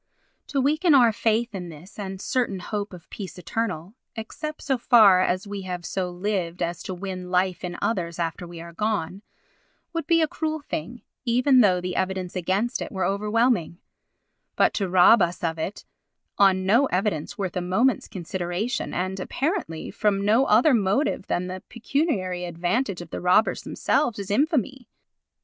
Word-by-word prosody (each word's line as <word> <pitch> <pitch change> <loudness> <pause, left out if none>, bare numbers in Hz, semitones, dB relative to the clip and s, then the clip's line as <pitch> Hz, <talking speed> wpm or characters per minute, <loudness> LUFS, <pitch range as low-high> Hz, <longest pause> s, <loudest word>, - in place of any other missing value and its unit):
To 280 - -1
weaken 305 +4 +3
our 240 -4 +6
faith 230 +1 0
in 180 -3 -5
this 165 +5 -12
sure 205 - -6
and 190 0 -6
certain 240 -3 -1
hope 205 +2 -4
of 180 -3 -12
peace 195 -3 -7
eternal 180 0 -3 0.2
(except 305 +8 -6
so 270 -3 0
far 215 -7 +6
as 185 +2 0
we 200 -1 -5
have 180 -2 -5
so 185 -2 -2
lived 180 -2 -2
as 170 0 -3
to 185 - -5
win 185 -1 -6
life 180 0 0
in 175 -1 -4
others 170 -6 -1
after 170 +1 -3
we 170 -1 -9
are 170 0 -10
gone) 200 -2 -2 0.7
would 330 -1 -3
be 335 -1 +4
a - - +2
cruel 315 0 -3
thing, 240 - -6 0.2
even 255 +2 +4
though 185 -5 +4
the 180 0 -4
evidence 190 -1 -2
against 190 +7 -1
it - - -5
were 190 -3 -1
overwhelming, 210 -2 +1 0.8
but - - +3
to 195 -3 -1
rob 185 +5 +6
us 175 +1 0
of 165 -1 -1
it 185 +5 -4 0.5
on 190 -2 +4
no 235 +8 +4
evidence 180 - -1
worth 190 -3 -3
a 180 - 0
moment's 210 +7 +1
consideration 185 +5 -3
and, 185 +2 -2
apparently, 275 - -3
from 200 -2 0
no 225 +6 +4
other 245 +7 +5
motive 205 +1 +1
than 175 - -1
the 185 0 -6
pecuniary 220 - -1
advantage 180 +4 -1
of 170 -2 -11
the - - -4
robbers 180 +5 +3
themselves 245 -8 0
is 200 -1 -5
infamy. 270 - 0
195 Hz, 170 wpm, -25 LUFS, 180-235 Hz, 0.8 s, our